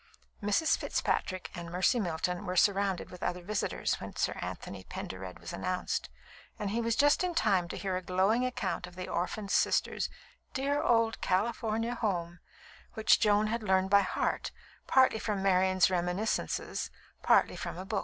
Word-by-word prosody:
Mrs. 210 +11 +2
Fitzpatrick 185 -1 -1
and 170 -1 -7
Mercy 185 +8 +2
Milton 180 -1 -2
were 180 - -2
surrounded 195 -1 +2
with 180 - -11
other 180 0 -2
visitors 210 +2 -1
when - - -7
Sir - - 0
Anthony 95 -1 -6
Pendered 95 0 -7
was 85 +1 -8
announced, 185 0 -2 0.5
and 205 -2 -3
he 230 +2 0
was 230 -1 0
just 290 +6 +4
in 360 -2 -1
time 195 - +2
to - - -6
hear 190 -2 -2
a 185 - -2
glowing 190 +7 +2
account 190 -8 -2
of 180 - -14
the 185 0 -5
orphaned 195 +3 -3
sisters' - - +1 0.5
"dear 285 +2 0
old 230 -1 +2
California 225 +3 0
home," 175 -7 -2 0.6
which 220 - +4
Joan 210 -1 +4
had 230 +2 -1
learned 190 -2 +2
by 200 0 +7
heart, 190 - -1 0.4
partly 260 -4 +4
from 205 -3 -2
Marian's 185 -1 +4
reminiscences, 180 +4 -1 0.3
partly - - +4
from - - -5
a 185 - -6
book. 200 +1 -1
195 Hz, 165 wpm, -31 LUFS, 180-220 Hz, 0.6 s, by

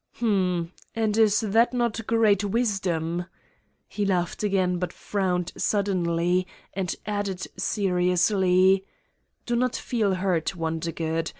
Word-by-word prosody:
"Hm!... 185 -7 0 0.2
And 220 -2 0
is 220 -1 +4
that 225 +3 +3
not 235 -2 -1
great 215 -3 +3
wisdom?" 185 -6 -1 0.6
He 210 - -3
laughed 180 -3 0
again 185 -4 +1
but 180 - -2
frowned 180 -3 -2
suddenly 180 -3 +1 0.3
and 190 -2 -2
added 205 -3 -2
seriously: 185 0 +2 0.6
"Do 240 - 0
not 250 0 +1
feel 210 -6 0
hurt, 185 -2 0
Wondergood. 165 0 -2
190 Hz, 110 wpm, -25 LUFS, 180-210 Hz, 0.6 s, is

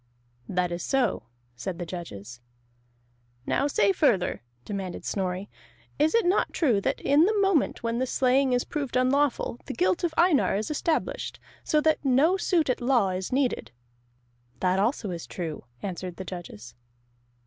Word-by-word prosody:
"That 180 -1 0
is 175 0 -3
so," 245 - 0 0.3
said 170 +9 -5
the 175 - -4
judges. 125 - -8 1.0
"Now 280 - +1
say 200 -8 +3
further," 195 - +1 0.2
demanded 195 -3 -5
Snorri. 190 0 -2 0.5
"Is 310 +6 +3
it 465 - +3
not 365 +3 +2
true 245 - +2
that - - -1
in 290 +4 +4
the 425 +1 +1
moment 390 -11 +2
when 230 +1 -1
the 260 - 0
slaying 260 +1 +2
is 245 0 +2
proved 280 -5 -4
unlawful, 255 -1 +1
the - - -4
guilt 185 - +1
of 330 -2 -1
Einar 340 - +4
is 215 +7 -2
established, 310 +2 -2 0.2
so 305 - +2
that 315 -1 +2
no 280 +7 +4
suit 345 -4 +1
at 255 - 0
law 240 -5 +3
is 185 0 -3
needed?" 260 -1 0 0.9
"That 185 +1 +2
also 210 -1 0
is 170 -2 -6
true," 165 -4 -5 0.2
answered 185 -2 -5
the 190 - -7
judges. 125 - -8
235 Hz, 160 wpm, -27 LUFS, 185-285 Hz, 1.0 s, in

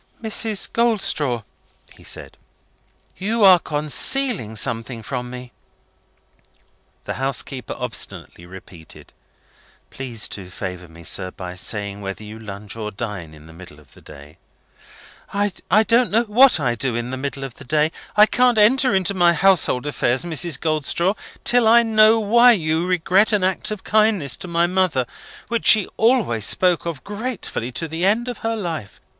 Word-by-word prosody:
"Mrs. 220 -2 -2
Goldstraw," 190 - +1 0.5
he - - -18
said, - - -6 0.8
"you 220 +3 -1
are 185 -2 +8
concealing 155 - 0
something 115 +1 -3
from 125 +1 -5
me!" 125 0 -9 1.5
The - - -3
housekeeper 135 -2 -2
obstinately 110 -7 -6
repeated, 90 -3 -14 0.8
"Please 120 -5 -3
to 95 -3 -8
favour 90 -1 -7
me, 85 +1 -15
sir, 90 +2 -3
by 90 -1 -8
saying 100 +2 -4
whether 100 +2 -6
you 105 +1 -10
lunch, 100 -1 -8
or 110 -2 -5
dine, 100 -7 -7
in 75 0 -16
the 80 - -14
middle 85 -3 -13
of 75 - -20
the - - -17
day?" 75 +1 -14 0.9
"I 205 0 +1
don't 235 +3 +3
know 225 +3 +2
what 240 -1 +5
I 125 -5 0
do 120 0 -3
in 120 +1 -3
the - - -3
middle 135 +1 -5
of 135 -3 -6
the - - -10
day. 150 +3 +1 0.3
I 210 - +9
can't 245 +1 +2
enter 245 +2 +4
into 190 0 +1
my 175 -2 +4
household 180 -9 +3
affairs, 130 0 -1
Mrs. 170 -2 -1
Goldstraw, 160 +4 0 0.3
till 240 -2 +3
I 235 +1 +6
know 220 0 +4
why 235 +3 +5
you 160 -3 -1
regret 185 +4 +3
an 205 -3 +2
act 185 0 -1
of 215 -3 -6
kindness 215 - +1
to - - -8
my 170 0 +1
mother, 180 -8 0 0.4
which 235 0 -2
she 215 -3 +6
always 220 - +1
spoke 180 +2 +1
of 160 -6 -5
gratefully 205 - -5
to 165 - -3
the 160 +2 -5
end 220 +6 +2
of 245 - -5
her 225 0 -2
life. 165 - -5
160 Hz, 160 wpm, -21 LUFS, -, 1.5 s, I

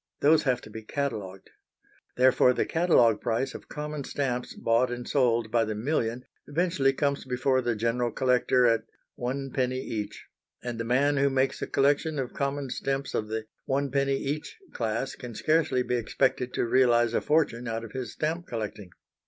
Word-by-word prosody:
Those 155 +2 +5
have 125 -2 +1
to 110 - -12
be 110 - -7
catalogued. 105 -7 -4 0.7
Therefore, 125 0 +5
the - - 0
catalogue 160 -10 +3
price 120 +3 -1
of - - -10
common 150 -1 -5
stamps 125 -3 -3
bought 115 +2 +2
and 120 0 -5
sold 120 -5 +2
by 115 -1 +3
the 110 -1 -3
million 120 0 -1 0.2
eventually 155 -3 +2
comes 140 0 -1
before 130 +1 +1
the 120 -2 0
general 115 +2 0
collector 125 0 +2
at 115 -1 +4 0.3
"one 135 +2 -4
penny 130 0 0
each," 105 -5 -5 0.4
and 120 -2 -4
the - - -1
man 140 +5 +2
who 140 +1 +3
makes 135 0 0
a - - -2
collection 145 +3 +2
of 130 -3 -3
common 140 -2 -2
stamps 135 +1 -2
of 105 - -1
the 110 0 -3 0.2
"one 140 0 0
penny 140 0 +1
each" 145 +3 -4 0.2
class 115 +3 -2
can 120 -3 -9
scarcely 155 +1 +2
be 125 - 0
expected 125 +2 0
to - - +1
realise 120 -1 +3
a - - +1
fortune 145 -6 +1
out 115 0 -3
of 115 - -9
his 130 -2 -5
stamp 165 +3 -2
collecting. 105 -4 -5
125 Hz, 175 wpm, -27 LUFS, 115-140 Hz, 0.7 s, Those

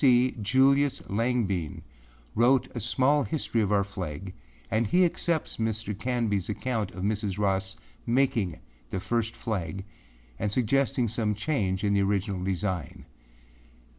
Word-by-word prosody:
C. 130 -2 +5
Julius 135 +6 +4
Langbein 100 - 0 0.5
wrote 125 +3 +3
a - - -1
small 140 +5 +3
history 120 -1 0
of 105 -1 0
our 100 -1 +4
flag 95 -2 -6 0.4
and 110 +1 +2
he 180 - +4
accepts 170 -1 -1
Mr. 110 -1 -1
Canbyâs 110 -4 -1
account 110 -1 -1
of 90 - -7
Mrs. 105 -1 -1
Ross 95 -2 0 0.3
making 115 - +1 0.3
the 95 - -2
first 115 +3 -1
flag 95 -3 -3 0.5
and 105 - 0
suggesting 125 +1 +2
some 110 -1 0
change 100 -6 -1
in 100 -1 +2
the 100 - +3
original 100 -1 0
design. 95 -4 -3
105 Hz, 135 wpm, -28 LUFS, 95-125 Hz, 0.5 s, C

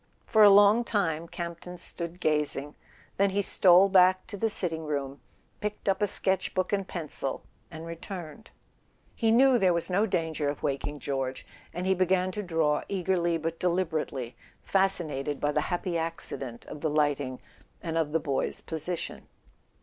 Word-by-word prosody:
For 220 - +3
a 210 - +10
long 205 +3 +6
time 170 -8 -1
Campton 170 +1 -7
stood 170 0 -7
gazing; 150 -3 0 0.4
then 200 0 +3
he 200 +1 0
stole 185 0 +5
back 185 -1 +4
to 205 - -8
the 225 +3 0
sitting 165 -6 0
room, 140 -2 -3 0.4
picked 210 0 -5
up 195 +1 +1
a 205 - +3
sketch 190 -1 +2
book 185 +1 0
and 195 -2 0
pencil 150 -5 -4 0.3
and 160 0 -9
returned. 170 +4 -8 0.6
He 225 - 0
knew 250 +2 +5
there 185 -4 +3
was 170 +2 -2
no 205 +4 +2
danger 160 -5 -1
of 145 - -6
waking 140 +1 -2
George, 135 -1 -3 0.3
and 180 +2 -4
he 190 - +3
began 185 0 +1
to 210 - -4
draw, 160 -5 +1
eagerly 180 -3 0
but 165 +1 -4
deliberately, 160 -8 -1 0.3
fascinated 155 -7 0
by 145 - 0
the 150 - +1
happy 175 -1 -1
accident 140 -7 -4
of 150 - -9
the 160 - 0
lighting, 145 -3 0 0.4
and 165 -2 -3
of 160 -2 0
the 160 - +2
boy's 140 -3 -2
position. 165 +2 -5
170 Hz, 165 wpm, -28 LUFS, 150-190 Hz, 0.6 s, a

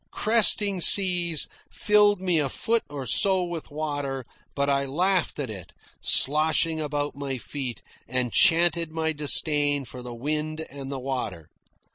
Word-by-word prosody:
Cresting 210 -3 +3
seas 175 -3 +5 0.2
filled 210 -2 +3
me 180 -3 0
a 140 -2 -1
foot 230 - -1
or 140 -2 -7
so 190 - +2
with 175 -2 -7
water, 145 -3 -5 0.3
but 140 0 -1
I 140 0 0
laughed 180 +6 -1
at 135 -6 -5
it 95 -5 -11 0.3
sloshing 155 +2 +2
about 145 -1 -4
my 140 -2 -5
feet, 130 -1 -7 0.2
and 125 -2 -2
chanted 170 -1 +3
my 160 0 -2
disdain 145 -1 +2
for 125 +2 -10
the 125 -1 -9
wind 155 +5 -4
and 140 -1 -8
the 135 - -5
water. 125 - -6
150 Hz, 145 wpm, -24 LUFS, 135-175 Hz, 0.3 s, seas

